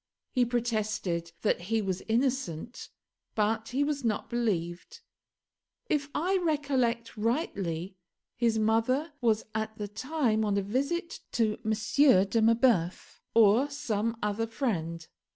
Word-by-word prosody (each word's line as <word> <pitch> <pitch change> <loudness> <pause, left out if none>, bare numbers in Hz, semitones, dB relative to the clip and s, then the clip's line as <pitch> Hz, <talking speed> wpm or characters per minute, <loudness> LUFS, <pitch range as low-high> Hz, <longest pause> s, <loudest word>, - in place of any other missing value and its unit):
He 250 -1 +3
protested 215 -8 -1
that 210 - +2
he 225 0 +2
was 190 -3 -2
innocent, 235 - -1 0.5
but 220 +1 +1
he 270 +3 +1
was 285 -2 -1
not 220 0 -1
believed. 210 - -2 0.9
If 295 -1 +1
I 370 +5 +2
recollect 265 -8 0
rightly, 200 - -2 0.4
his 230 -2 +1
mother 230 +8 +1
was 220 -3 +2
at 220 0 -3
the 210 - -4
time 225 0 0
on 205 -1 +1
a 200 - +1
visit 280 - -2
to 220 -2 +1
M. 220 - +1 0.5
de 225 +3 +1
Marbeuf, 225 -6 +2
or 230 +5 +5
some 230 -6 -2
other 210 +2 0
friend. 170 - -2
225 Hz, 125 wpm, -29 LUFS, 210-260 Hz, 0.9 s, or